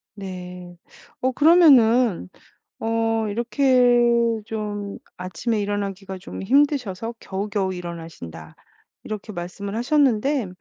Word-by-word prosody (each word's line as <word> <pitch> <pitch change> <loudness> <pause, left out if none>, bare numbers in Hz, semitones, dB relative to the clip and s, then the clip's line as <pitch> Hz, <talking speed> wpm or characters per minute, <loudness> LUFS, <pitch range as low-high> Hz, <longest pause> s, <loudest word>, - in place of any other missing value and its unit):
네. 180 -2 -8 0.5
어 260 +1 +1
그러면은 250 - +5 0.5
어 225 0 0
이렇게 245 +2 +3 0.5
좀 205 -2 -5 0.2
아침에 185 +5 -2
일어나기가 200 -2 -3
좀 180 - -8
힘드셔서 240 -3 +1
겨우겨우 195 -1 -2
일어나신다. 165 - -9 0.5
이렇게 215 0 -6
말씀을 190 +3 -6
하셨는데 260 -1 +2
210 Hz, 245 characters per minute, -23 LUFS, 190-245 Hz, 0.5 s, 그러면은